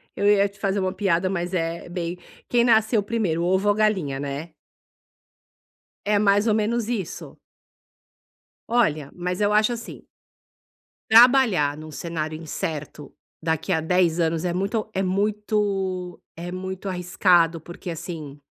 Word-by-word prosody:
eu 200 Hz, -, -1 dB
ia 200 Hz, -1 st, +4 dB
te 200 Hz, 0 st, -22 dB
fazer 195 Hz, 0 st, 0 dB
uma 185 Hz, 0 st, -1 dB
piada, 185 Hz, -1 st, +1 dB
mas 175 Hz, -1 st, -3 dB
é, 165 Hz, -1 st, -2 dB
bem 175 Hz, 0 st, -4 dB, 0.3 s
"quem 240 Hz, -1 st, +3 dB
nasceu 220 Hz, -2 st, +3 dB
primeiro, 200 Hz, -7 st, -1 dB
ovo 190 Hz, +3 st, +2 dB
ou 205 Hz, -, +3 dB
galinha", 190 Hz, -11 st, +1 dB
né. 145 Hz, +3 st, -5 dB, 1.5 s
É 205 Hz, 0 st, +2 dB
mais 205 Hz, +2 st, +3 dB
ou 215 Hz, -, +3 dB
menos 220 Hz, +1 st, 0 dB
isso. 210 Hz, -8 st, -5 dB, 1.3 s
Olha, 155 Hz, -, +1 dB
mas 180 Hz, +1 st, -3 dB
eu 205 Hz, 0 st, +3 dB
acho, 215 Hz, +3 st, +4 dB
assim 235 Hz, -, -8 dB, 1.1 s
trabalhar 225 Hz, -, +6 dB
num 155 Hz, 0 st, -9 dB
cenário 155 Hz, -1 st, -4 dB
incerto, 150 Hz, -2 st, -5 dB, 0.3 s
daqui 160 Hz, +3 st, -1 dB
a 160 Hz, -, +1 dB
10 175 Hz, 0 st, +2 dB
anos 165 Hz, +1 st, 0 dB
é 175 Hz, -, 0 dB
muito 200 Hz, +4 st, -2 dB
é 190 Hz, -, 0 dB
muito 195 Hz, -2 st, -1 dB
é 175 Hz, +2 st, -6 dB
muito 190 Hz, +1 st, -5 dB
arriscado 175 Hz, -2 st, +2 dB
porque, 175 Hz, +2 st, -9 dB
assim 155 Hz, -4 st, -7 dB
185 Hz, 140 wpm, -24 LUFS, 165-210 Hz, 1.5 s, trabalhar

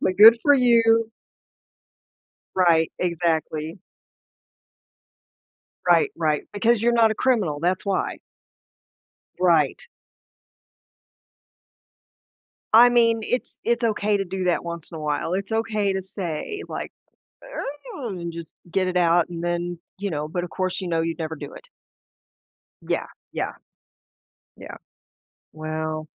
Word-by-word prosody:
like, 185 Hz, -, 0 dB
"Good 225 Hz, +3 st, +9 dB
for 290 Hz, -1 st, +6 dB
you." 230 Hz, -3 st, +4 dB, 1.5 s
Right, 170 Hz, -3 st, +3 dB
exactly. 165 Hz, -1 st, -1 dB, 2.1 s
Right, 425 Hz, -, +4 dB
right, 155 Hz, -2 st, 0 dB
because 225 Hz, +2 st, +2 dB
you're 240 Hz, 0 st, +3 dB
not 225 Hz, -2 st, +5 dB
a -, -, 0 dB
criminal, 215 Hz, -, +1 dB
that's 180 Hz, +3 st, 0 dB
why. 195 Hz, -1 st, -1 dB, 1.2 s
Right. 165 Hz, -6 st, +2 dB, 2.9 s
I 235 Hz, +3 st, +9 dB
mean, 230 Hz, -2 st, +3 dB
it's 250 Hz, +3 st, -3 dB
it's 235 Hz, 0 st, +1 dB
okay 210 Hz, -2 st, +1 dB
to 195 Hz, -, -1 dB
do 185 Hz, +1 st, -4 dB
that 175 Hz, -1 st, +1 dB
once 170 Hz, -1 st, -7 dB
in 165 Hz, -, -8 dB
a -, -, -7 dB
while. 150 Hz, +3 st, -1 dB
It's 195 Hz, +2 st, -3 dB
okay 215 Hz, -3 st, 0 dB
to 190 Hz, 0 st, -2 dB
say 190 Hz, -, -5 dB
like, -, -, -5 dB, 0.5 s
"Ugh" 280 Hz, -, -6 dB
and 170 Hz, 0 st, -5 dB
just 165 Hz, -1 st, -9 dB, 0.2 s
get 185 Hz, +1 st, +1 dB
it 180 Hz, -, -3 dB
out 175 Hz, -1 st, +3 dB
and 170 Hz, -1 st, -6 dB
then, 175 Hz, 0 st, -2 dB, 0.2 s
you 200 Hz, -1 st, -3 dB
know 150 Hz, -1 st, -3 dB
but 175 Hz, +2 st, -3 dB
of 175 Hz, -, -8 dB
course 185 Hz, 0 st, -2 dB
you 180 Hz, -, -4 dB
know 165 Hz, -1 st, +1 dB
you'd 165 Hz, +1 st, -2 dB
never 160 Hz, 0 st, -3 dB
do -, -, -9 dB
it. -, -, -13 dB, 1.2 s
Yeah, -, -, -2 dB, 0.3 s
yeah. -, -, -2 dB, 1.0 s
Yeah. -, -, -10 dB, 0.8 s
Well 155 Hz, 0 st, -4 dB
185 Hz, 130 wpm, -24 LUFS, 165-225 Hz, 2.9 s, Good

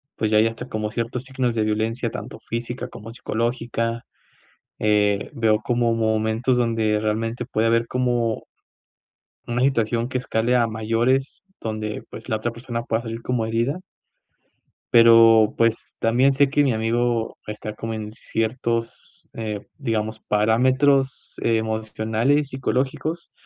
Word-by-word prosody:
pues, 110 Hz, -1 st, -1 dB
ya 105 Hz, -, +5 dB
hay 110 Hz, -, +5 dB
hasta 115 Hz, 0 st, -6 dB
como 110 Hz, 0 st, -3 dB
ciertos 120 Hz, +1 st, -3 dB
signos 130 Hz, -2 st, -1 dB
de 110 Hz, -, +1 dB
violencia 110 Hz, +2 st, -1 dB
tanto -, -, -7 dB
física 120 Hz, +2 st, -4 dB
como 115 Hz, -1 st, -10 dB
psicológica, 115 Hz, 0 st, -2 dB, 0.8 s
eh, 105 Hz, -1 st, +2 dB
veo 110 Hz, -2 st, +2 dB
como 120 Hz, -1 st, +2 dB
momentos 110 Hz, +2 st, +1 dB
donde 115 Hz, -3 st, +1 dB
realmente 115 Hz, +3 st, -2 dB
puede 115 Hz, -2 st, 0 dB
haber 115 Hz, 0 st, +2 dB
como 120 Hz, -3 st, 0 dB, 1.0 s
una 120 Hz, +1 st, -1 dB
situación 115 Hz, -3 st, +1 dB
que 130 Hz, -, -1 dB
escale 120 Hz, 0 st, 0 dB
a 120 Hz, -2 st, +3 dB
mayores, 115 Hz, -, 0 dB
donde, 110 Hz, -1 st, -4 dB
pues, 110 Hz, -, -9 dB
la 110 Hz, -, +1 dB
otra 115 Hz, +2 st, -2 dB
persona 115 Hz, 0 st, -5 dB
pueda 115 Hz, -1 st, -1 dB
salir 115 Hz, 0 st, -5 dB
como 125 Hz, -3 st, 0 dB
herida 115 Hz, +9 st, 0 dB, 1.1 s
pero, 115 Hz, -2 st, +7 dB
pues, 115 Hz, -1 st, +1 dB
también 125 Hz, +4 st, +3 dB
sé 140 Hz, 0 st, +3 dB
que 145 Hz, +1 st, +3 dB
mi 130 Hz, -, +2 dB
amigo 115 Hz, +1 st, 0 dB
está 105 Hz, 0 st, -5 dB
como 115 Hz, +1 st, -4 dB
en 105 Hz, -1 st, -5 dB
ciertos, 115 Hz, +1 st, -3 dB
eh, 105 Hz, -2 st, -4 dB
digamos, 110 Hz, -1 st, -2 dB
parámetros 130 Hz, +6 st, +2 dB
emocionales, 110 Hz, +5 st, 0 dB
psicológicos, 135 Hz, +5 st, -2 dB
115 Hz, 135 wpm, -23 LUFS, 110-125 Hz, 1.1 s, pero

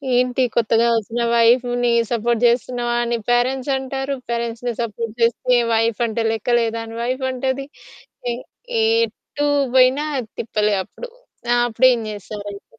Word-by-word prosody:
ఏంటి, 250 Hz, +1 st, +2 dB
కొత్తగా 230 Hz, 0 st, +3 dB
ఒచ్చిన 225 Hz, +2 st, -3 dB
వైఫ్‌ని 245 Hz, +1 st, +3 dB, 0.2 s
సపోర్ట్ 235 Hz, 0 st, 0 dB
జేస్తున్నావా 240 Hz, 0 st, +1 dB
అని 235 Hz, 0 st, -1 dB
పేరెంట్సంటారు, 265 Hz, +2 st, 0 dB
పేరెంట్స్‌ని 235 Hz, 0 st, -2 dB
సపోర్ట్ 230 Hz, 0 st, -4 dB
చేస్తే 245 Hz, +2 st, +3 dB, 0.2 s
వైఫంటే 225 Hz, 0 st, 0 dB
లెక్క 225 Hz, +2 st, 0 dB
లేదా 230 Hz, -1 st, -1 dB
అని 225 Hz, 0 st, -9 dB
వైఫంటది. 260 Hz, +1 st, -2 dB, 0.7 s
ఎ -, -, -1 dB, 0.7 s
ఎటూ 290 Hz, -9 st, -4 dB, 0.3 s
బోయినా 260 Hz, +3 st, +5 dB, 0.3 s
తిప్పలే 210 Hz, -2 st, 0 dB
అప్పుడు. -, -, -10 dB, 0.4 s
ఆ! -, -, +4 dB
అప్పుడేం 245 Hz, +1 st, +4 dB
జేస్తారయితే? 205 Hz, 0 st, -8 dB
240 Hz, 115 wpm, -20 LUFS, 230-255 Hz, 0.7 s, బోయినా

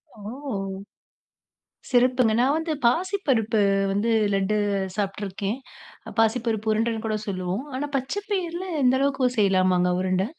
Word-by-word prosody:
ஓ! -, -, -15 dB, 1.7 s
சிறப்புங்க! 250 Hz, -2 st, +3 dB
நான் 270 Hz, +4 st, +3 dB
வந்து 320 Hz, 0 st, -2 dB
பாசிப்பருப்பு 265 Hz, -, +1 dB, 0.3 s
வந்து 205 Hz, +4 st, 0 dB, 0.2 s
லட்டு 195 Hz, +2 st, +1 dB, 0.4 s
சாப்ட்டுருக்கேன். 200 Hz, +2 st, -3 dB, 0.6 s
பாசிப்பருப்பு 225 Hz, -1 st, +1 dB
உருண்டன்னு 225 Hz, 0 st, -1 dB
கூட 215 Hz, -1 st, 0 dB
சொல்லுவோம். 185 Hz, +3 st, -2 dB
ஆனா 290 Hz, +3 st, -2 dB
பச்ச 265 Hz, 0 st, -3 dB, 0.2 s
பயிர்ல 360 Hz, -2 st, -2 dB, 0.2 s
இந்த 255 Hz, +1 st, +4 dB
அளவுக்கு 270 Hz, -2 st, +2 dB
செய்யலாமாங்க 185 Hz, -2 st, +3 dB
உருண்ட? 185 Hz, 0 st, +1 dB
225 Hz, 110 wpm, -24 LUFS, 200-260 Hz, 1.7 s, இந்த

